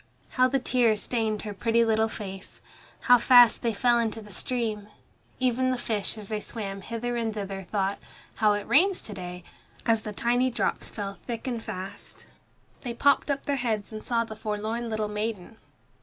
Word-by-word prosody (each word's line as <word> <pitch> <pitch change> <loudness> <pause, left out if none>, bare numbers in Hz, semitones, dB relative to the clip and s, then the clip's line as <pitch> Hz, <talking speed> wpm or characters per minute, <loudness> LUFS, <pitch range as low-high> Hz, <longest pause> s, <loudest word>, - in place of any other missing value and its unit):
How 255 0 +3
the 270 +1 +1
tears 240 -4 +2
stained 220 -3 -1
her 210 -1 -5
pretty 230 +3 +2
little 220 0 +2
face! 195 -3 -8 0.4
How 245 -1 +6
fast 245 -1 +7
they 235 - +1
fell 240 +3 +3
into 225 -1 -1
the 210 -1 -12
stream! 215 -1 -1 0.5
Even 255 0 +2
the 255 - 0
fish 220 -2 -3
as 210 -2 -6
they 215 0 -2
swam 200 -3 -6
hither 235 +3 -3
and 225 -1 -1
thither 195 -2 -5
thought, 200 -1 0 0.4
"How 215 -2 +4
it 205 0 -3
rains 370 +5 +4
to 215 - -7
day," 180 -2 -7 0.4
as 225 -2 +3
the 215 - -5
tiny 245 +4 +1
drops 240 - -2
fell 200 -2 -6
thick 235 -2 -4
and 240 -3 -2
fast. 185 -2 -8 0.6
They 240 -3 -5
popped 280 +3 +3
up 280 -1 -1
their 285 -1 0
heads 220 -4 -2
and 215 - -6
saw 230 -1 +1
the 220 -1 -8
forlorn 220 +2 -3
little 215 -1 -1
maiden. 210 0 -4
225 Hz, 185 wpm, -27 LUFS, 210-240 Hz, 0.6 s, fast